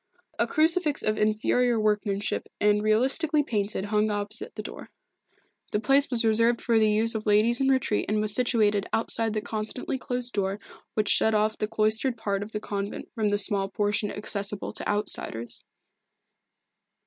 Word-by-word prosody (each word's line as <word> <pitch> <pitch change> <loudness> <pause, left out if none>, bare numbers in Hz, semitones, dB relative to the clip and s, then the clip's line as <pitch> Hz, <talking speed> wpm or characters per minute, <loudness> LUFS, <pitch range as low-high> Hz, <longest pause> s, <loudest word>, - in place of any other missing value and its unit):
A - - +2
crucifix 315 -1 +1
of 215 - +1
inferior 220 +3 +2
workmanship 210 -1 -1
and 210 0 +3
realistically 270 +8 +2
painted 205 -5 -2
hung 210 0 +2
opposite 205 +2 -4
the - - -5
door. - - -9 0.8
The 210 - +2
place 275 +5 +3
was 235 -2 0
reserved 230 +2 +3
for 230 -2 +2
the 215 -1 +3
use 220 +2 +2
of 220 -1 -4
ladies 220 +4 +3
in 270 - +2
retreat 260 -5 +1
and 210 0 +1
was 210 -1 +2
situated 210 -4 +2
outside 225 -1 +1
the 215 - -1
constantly 220 +4 -4
closed 245 -1 -2
door 195 -1 -1 0.4
which 215 -1 0
shut 220 0 +3
off 215 +1 +1
the 215 - -1
cloistered 220 +3 +1
part 200 -3 -2
of 205 +2 -7
the 210 - -3
convent 200 -1 -5
from 215 -2 0
the 205 - +1
small 195 -1 +1
portion 205 +1 -1
accessible 205 -1 -2
to - - -2
outsiders. 205 - -2
215 Hz, 165 wpm, -26 LUFS, 205-235 Hz, 0.8 s, and